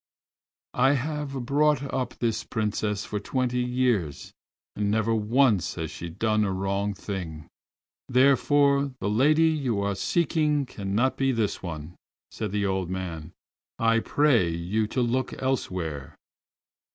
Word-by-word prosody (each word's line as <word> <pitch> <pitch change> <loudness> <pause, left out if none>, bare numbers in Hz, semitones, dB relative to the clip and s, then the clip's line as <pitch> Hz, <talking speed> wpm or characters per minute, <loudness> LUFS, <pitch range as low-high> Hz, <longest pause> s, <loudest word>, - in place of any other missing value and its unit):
"I 135 +3 +4
have 140 -2 -3
brought 145 +1 +2
up 125 -2 -2
this 115 -2 -1
Princess 105 -2 -2
for 105 - -3
twenty 125 +3 -1
years 125 - -1 0.4
and 105 -1 0
never 110 +2 +1
once 110 - +2
has - - -4
she 85 - -7
done 110 +5 +1
a 100 - 0
wrong 100 +2 -1
thing, 85 -6 -6 0.6
therefore 140 +1 +3
the 100 - -1
lady 155 +8 +4
you 135 -9 -1
are 100 0 0
seeking 150 - +1
cannot 105 +3 -1
be 135 0 +2
this 115 -5 -1
one," 80 -2 -6 0.4
said 105 -3 -4
the 100 0 0
old 95 -2 -1
man. 90 -4 -5 0.5
"I 115 0 +3
pray 125 - +3
you 90 +6 -1
to 125 - -1
look 125 +2 -1
elsewhere." 90 - -3
110 Hz, 135 wpm, -26 LUFS, 100-135 Hz, 0.6 s, I